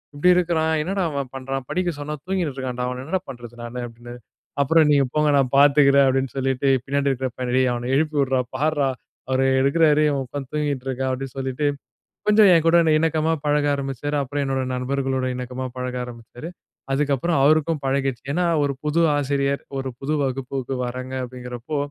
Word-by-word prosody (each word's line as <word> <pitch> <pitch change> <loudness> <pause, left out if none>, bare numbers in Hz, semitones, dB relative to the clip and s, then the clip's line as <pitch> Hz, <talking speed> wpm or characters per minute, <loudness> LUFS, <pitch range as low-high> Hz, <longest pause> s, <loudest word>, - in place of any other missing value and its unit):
இப்படி 165 +5 +3
இருக்கிறான் 160 -3 +1
என்னடா 190 +4 -1
அவன் 140 -3 -3
பண்றான்? 135 0 -4
படிக்க 180 -1 0
சொன்னா 150 +1 -4
தூங்கினு 185 -5 -1
இருக்கான்டா. 125 -2 -3
அவன 125 0 -5
என்னடா 175 +6 -2
பண்ணுறது 120 -2 -9
நானு?" 120 +1 -6
அப்படின்னாரு. 120 +1 -11 0.4
"அப்புறம் 160 +2 +4
நீங்க 140 -2 +4
போங்க 150 0 +3
நான் 130 -2 +1
பார்த்துக்கிறேன்" 140 -1 +6
அப்படின்னு 135 0 0
சொல்லிட்டு. 135 +1 0 0.2
பின்னாடி 140 0 0
இருக்கிற 130 0 -2
பையனை, 125 -1 -3
"டேய் 130 -1 +3
அவனை 120 +1 -4
எழுப்பி 155 0 0
உட்றா. 130 -1 +1 0.2
பார்றா 145 -1 +1 0.4
அவரு 130 0 +2 0.2
எடுக்கிறாரு. 150 +2 +4
இவன் 140 -2 -1
உட்காந்து 135 0 -6
தூங்கிட்டு 140 -3 -2
இருக்கான்" 130 0 -1
அப்படின்னு 135 0 -5
சொல்லிட்டு, 135 +2 -1 0.6
கொஞ்சம் 210 -2 +6
என்கூட 165 0 +4 0.2
இணக்கமாக 160 0 +1
பழக 145 0 +2
ஆரம்பிச்சாரு. 140 +1 -3
அப்புறம் 145 +2 -3
என்னோட 135 -1 -1
நண்பர்களோட 130 0 -1
இணக்கமா 125 +1 -5
பழக 125 0 -4
ஆரம்பிச்சாரு, 120 +6 -10 0.4
அதுக்கப்புறம் 145 +3 +1
அவருக்கும் 155 +1 +3
பழகிடுச்சு. 135 -2 -1
ஏன்னா, 180 +3 +1 0.2
ஒரு 140 -1 0
புது 150 +2 0 0.2
ஆசிரியர் 140 0 0 0.2
ஒரு 135 - -3
புது 140 +3 -2
வகுப்புக்கு 135 0 -3
வர்றாங்க 130 +1 -6
அப்படிங்கிறப்போ, 125 +3 -6
135 Hz, 165 wpm, -22 LUFS, 130-150 Hz, 0.6 s, பார்த்துக்கிறேன்